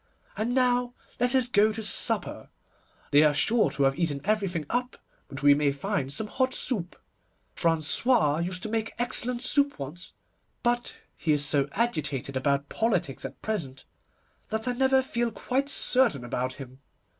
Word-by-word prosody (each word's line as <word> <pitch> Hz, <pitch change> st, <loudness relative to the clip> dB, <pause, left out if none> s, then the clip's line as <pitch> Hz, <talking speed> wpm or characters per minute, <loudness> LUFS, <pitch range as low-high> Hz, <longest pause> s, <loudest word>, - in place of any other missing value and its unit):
And 235 Hz, +4 st, -1 dB
now 245 Hz, -1 st, +2 dB, 0.2 s
let 245 Hz, +1 st, +1 dB
us 255 Hz, -2 st, +3 dB
go 215 Hz, -2 st, +3 dB
to 220 Hz, +1 st, -6 dB
supper. 205 Hz, -, -1 dB, 0.6 s
They 145 Hz, -, +6 dB
are 150 Hz, -1 st, +4 dB
sure 225 Hz, +2 st, +3 dB
to 140 Hz, 0 st, -1 dB
have 135 Hz, +3 st, +1 dB
eaten 155 Hz, -5 st, 0 dB
everything 195 Hz, -7 st, -1 dB
up, 250 Hz, +5 st, -2 dB, 0.3 s
but 135 Hz, 0 st, -8 dB
we 145 Hz, 0 st, +7 dB
may 145 Hz, 0 st, +2 dB
find 140 Hz, -1 st, -2 dB
some 210 Hz, +10 st, 0 dB
hot 260 Hz, +4 st, -1 dB
soup. 185 Hz, -9 st, -2 dB, 0.6 s
François 165 Hz, -, +2 dB
used 180 Hz, +1 st, -4 dB
to 220 Hz, -, -3 dB
make 225 Hz, 0 st, -2 dB
excellent 245 Hz, 0 st, -1 dB
soup 285 Hz, +1 st, +1 dB
once, 150 Hz, +5 st, -8 dB, 0.5 s
but 240 Hz, 0 st, 0 dB, 0.2 s
he 160 Hz, -, -1 dB
is 145 Hz, 0 st, +1 dB
so 140 Hz, -1 st, +2 dB
agitated 145 Hz, -, -2 dB
about 140 Hz, +2 st, 0 dB
politics 190 Hz, -, -1 dB
at 135 Hz, -, -9 dB
present, 150 Hz, -12 st, -4 dB, 0.6 s
that 220 Hz, +2 st, -3 dB
I -, -, +2 dB
never 265 Hz, +1 st, +3 dB
feel 240 Hz, -2 st, -1 dB
quite 265 Hz, +6 st, -2 dB
certain 250 Hz, -, +3 dB
about 125 Hz, +2 st, -2 dB
him. 130 Hz, -1 st, -11 dB
200 Hz, 160 wpm, -27 LUFS, -, 0.6 s, we